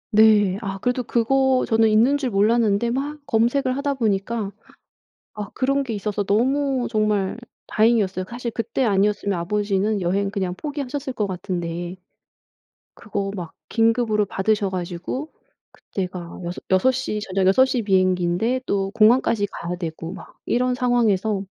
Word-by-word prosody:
네, 210 -3 +5
아 195 -3 -4
그래도 250 +3 0
그거 260 +3 +2
저는 225 0 +3
있는 235 +7 +4
줄 265 -4 -2
몰랐는데 215 +2 +2
막 280 +5 -3
검색을 255 +4 +1
하다 280 0 0
보니까 215 -3 -1 0.8
아 210 -2 -6
그런 275 +2 +1
게 245 -5 -4
있어서 205 0 -2
너무 260 +5 +1
정말 215 -3 0 0.3
다행이었어요. 215 -4 +2
사실 240 0 -4
그때 230 +4 -1
아니었으면 205 -2 +1
아버지는 205 +3 0
여행 195 +3 0
그냥 190 -3 -2
포기하셨을 285 +1 -4
거 215 -4 -1
같은데. 175 -1 -4 1.0
그거 200 -2 -4
막 175 -4 -7 0.2
긴급으로 225 -2 +2
받으셔가지고 190 - -2 0.4
그때가 180 -3 -6 0.3
여섯시 250 +3 +2
저녁 190 -2 0
여섯 225 +8 +6
시 260 -2 -1
비행기인데 185 +4 +1
또 195 -1 0
공항까지 225 -1 +3
가야되고 170 -1 -5
막 - - -12
이런 250 +1 +1
상황에서 220 -5 +1
215 Hz, 315 characters per minute, -22 LUFS, 195-245 Hz, 1.0 s, 여섯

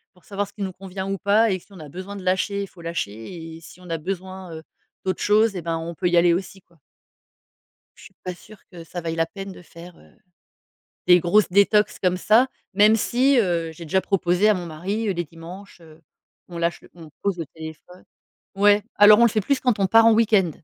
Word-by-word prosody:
pour 180 - -25
savoir 200 0 -3
ce - - -19
qui 205 -1 -6
nous 190 -1 -4
convient 190 0 -7
ou 195 0 -3
pas. 210 +3 +3
Et 185 - -1
si - - -24
on 185 - -13
a 150 -2 -10
besoin 185 +5 -8
de 190 - -8
lâcher, 195 +2 0
il - - -7
faut 175 - -17
lâcher. 165 - -6
Et - - -16
si 165 - -15
on 180 - -13
a 165 - -2
besoin, 185 +1 -6
heu, 160 - -9 0.4
d'autres 185 - -2
choses 210 0 +3
et 180 - -4
ben 165 0 -2
on 165 +1 -6
peut 180 +3 -2
y 175 - +2
aller 170 0 +5
aussi, 190 +1 -5
quoi. 170 -2 -29 1.2
Je - - -16
suis - - -16
pas 180 - -4
sûre 215 +4 -16
que 170 -2 -10
ça 175 +1 -7
vaille 165 0 -4
la 165 - +1
peine 195 +3 -9
de 180 - -13
faire, 170 +1 -14
heu, - - -21 1.0
des 180 0 +7
grosses 185 +5 +2
détox 200 +2 +3
comme 180 -1 +1
ça, 225 +7 +4 0.3
même 210 +2 +5
si, 255 +4 +2
heu, 170 -5 0
j'ai 165 +1 -11
déjà 190 +5 +1
proposé 190 +1 +1
à - - +5
mon 180 -3 -5
mari, 195 +8 -4
heu, - - 0
les 175 0 -2
dimanches, 170 +4 -12
heu, 160 0 -17 0.5
on 175 -1 -9
lâche 170 -1 -2
on 165 -3 -13
pose 200 -3 -1
le 165 - -3
téléphone. 160 +4 -12 0.5
Ouais, 205 +1 +4
alors 210 +1 +8
on 235 - +6
le - - +5
fait 215 - 0
plus 280 +5 0
quand 250 -5 +1
on 195 - +2
part 225 +3 +5
en 230 - +7
week-end. 210 -6 +3
185 Hz, 235 wpm, -23 LUFS, 170-205 Hz, 1.2 s, alors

